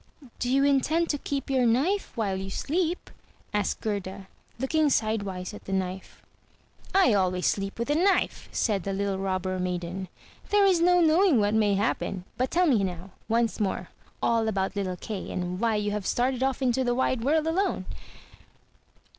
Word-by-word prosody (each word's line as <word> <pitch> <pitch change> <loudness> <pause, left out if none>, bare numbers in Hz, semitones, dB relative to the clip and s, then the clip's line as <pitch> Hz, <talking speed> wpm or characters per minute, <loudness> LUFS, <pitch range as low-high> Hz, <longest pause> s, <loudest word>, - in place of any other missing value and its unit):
"Do 245 - -1
you 270 +2 +3
intend 285 +4 +2
to 290 - -3
keep 275 -1 -3
your 255 -2 +3
knife 305 - +1
while 205 -4 0
you 190 0 -5
sleep?" 335 - -2 0.4
asked 210 -2 -1
Gerda, 195 -2 -4 0.3
looking 300 +4 +1
sidewise 205 -6 -1
at 210 - -11
the 195 - -4
knife. 190 0 -4 0.7
"I 380 - +5
always 185 -2 +1
sleep 195 0 -1
with 235 - -2
the - - +3
knife," 370 +6 +1
said 205 -4 0
the 195 +2 -3
little 195 0 -1
Robber 185 -1 -2
maiden; 180 +1 -3 0.4
"there 410 -1 +4
is 365 -4 +4
no 355 +1 +5
knowing 325 - +4
what 205 0 +2
may 210 -2 +3
happen. 195 -2 -1
But 255 +1 0
tell 360 +2 +3
me 245 - +3
now, 185 0 -5 0.2
once 230 +1 +1
more, 200 -3 -2 0.3
all 230 -1 +2
about 195 -2 -1
little 185 -3 -2
Kay, 200 +1 -6
and 180 0 -3
why 225 -1 +1
you 210 0 -1
have 205 -2 -3
started 255 +1 0
off 265 0 0
into 260 +1 +2
the 245 -1 +1
wide 260 -2 0
world 305 +4 +2
alone." 365 +5 0
220 Hz, 175 wpm, -27 LUFS, 195-275 Hz, 0.7 s, I